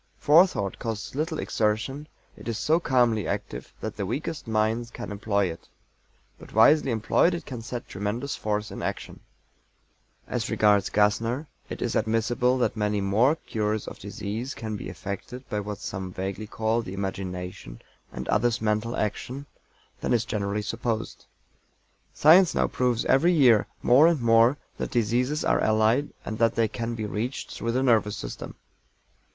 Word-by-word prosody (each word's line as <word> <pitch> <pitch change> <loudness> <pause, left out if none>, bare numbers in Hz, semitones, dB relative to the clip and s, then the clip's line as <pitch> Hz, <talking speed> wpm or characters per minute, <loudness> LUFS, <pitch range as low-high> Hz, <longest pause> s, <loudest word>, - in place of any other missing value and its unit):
Forethought 150 - +3
costs 110 -3 -4
little 155 +3 -2
exertion: 115 +8 -1 0.3
it - - -12
is 115 -2 -2
so 160 +8 +2
calmly 120 - +2
active - - -4
that - - -5
the 100 - -2
weakest 145 - -4
minds 110 +2 0
can 120 -2 -7
employ 100 -1 0
it; 85 -2 -7 0.7
but - - -13
wisely 140 +6 +6
employed 115 +9 +2
it 170 - -7
can 125 -4 -6
set 120 +1 -6
tremendous 105 +8 -3
force 105 0 -2
in - - -6
action. - - -5 1.1
As - - -2
regards 105 -2 +3
GASSNER, 115 +7 +1 0.2
it - - -4
is - - -2
admissible 115 +3 +1
that 125 - 0
many 105 -1 0
more 110 +9 +3
cures 110 -7 -2
of - - -8
disease 105 +6 -5
can 110 -1 -5
be 100 - -6
effected 100 +7 -7
by 105 - -1
what 105 0 -5
some 95 -1 -5
vaguely 95 +3 -4
call 110 +2 0
the 95 -4 -7
Imagination, 90 -9 -5 0.3
and - - -6
others 115 +2 +2
Mental 110 +2 0
Action, 125 +6 -3 0.5
than - - 0
is 115 -2 +2
generally 105 0 -2
supposed. 115 0 -3 0.8
Science 170 +4 +6
now - - +3
proves 125 -2 0
every 170 +7 +4
year, 125 -9 +5 0.2
more 135 +6 +6
and 170 -3 +2
more, 115 +3 +4 0.2
that - - -2
diseases 125 +5 0
are - - +2
allied, 110 +6 +2 0.2
and 110 - -5
that 115 -1 +3
they 115 -1 +2
can 115 +2 -4
be 110 -1 -3
reached 110 +5 -4
through 115 - -2
the 130 +2 +1
nervous 110 -4 +2
system. - - -7
115 Hz, 160 wpm, -26 LUFS, 105-125 Hz, 1.1 s, wisely